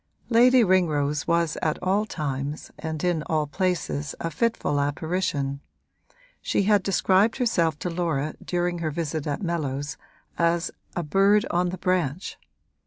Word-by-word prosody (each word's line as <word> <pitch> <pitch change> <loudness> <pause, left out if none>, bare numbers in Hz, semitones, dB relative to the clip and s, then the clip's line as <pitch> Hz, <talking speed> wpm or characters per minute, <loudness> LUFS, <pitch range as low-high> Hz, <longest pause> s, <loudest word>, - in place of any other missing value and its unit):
Lady 245 +1 +6
Ringrose 150 -7 +1
was 170 -2 +1
at 155 -1 0
all 200 +3 +1
times 140 -2 -4
and 160 -2 -4
in 175 -3 +1
all 155 -2 +1
places 155 -3 -2
a 165 - -3
fitful 160 -5 0
apparition; 145 -2 -1 0.8
she - - +1
had 205 0 +4
described 195 +3 +2
herself 170 - +1
to 180 - -3
Laura 160 -4 -1
during 175 -1 -1
her 160 -2 -1
visit 155 -1 -3
at 145 +5 -2
Mellows 145 -5 -2 0.4
as 170 +1 +2 0.2
'a 175 - -1
bird 195 +6 +3
on 175 +1 +1
the 185 - -5
branch.' 180 -2 -1
170 Hz, 140 wpm, -25 LUFS, 150-185 Hz, 0.8 s, Lady